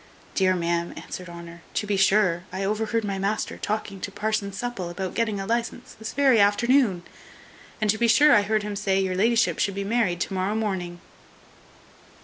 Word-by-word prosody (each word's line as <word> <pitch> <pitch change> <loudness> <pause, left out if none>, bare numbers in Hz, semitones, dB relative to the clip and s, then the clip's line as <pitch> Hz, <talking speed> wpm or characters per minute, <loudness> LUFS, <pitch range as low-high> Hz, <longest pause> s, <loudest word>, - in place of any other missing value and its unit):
"Dear 185 -1 +2
ma'am," 170 0 -1
answered 180 -1 -8
Honour, 170 0 -10
"to 210 - 0
be 205 -1 0
sure, 190 -3 +3
I 190 +1 -3
overheard 220 +3 -1
my 200 -2 -3
master 200 +3 -1
talking 205 -2 -3
to 200 - -4
parson 210 0 -2
Supple 195 -3 -4
about 185 +2 -4
getting 220 -3 -1
a 195 - -4
licence 235 +2 -3
this 220 0 -7
very 270 -5 +4
afternoon; 205 -1 +3 0.8
and 215 - 0
to 220 - -4
be 235 - +3
sure 285 +7 +6
I 210 - +6
heard 215 +1 0
him 210 -1 -4
say, 195 -1 +1
your 190 -1 0
la'ship 225 +5 +2
should 200 - 0
be 200 - -2
married 205 -4 0
to 195 - -2
morrow 190 +3 -1
morning." 185 -5 -3
205 Hz, 185 wpm, -25 LUFS, 185-220 Hz, 0.8 s, sure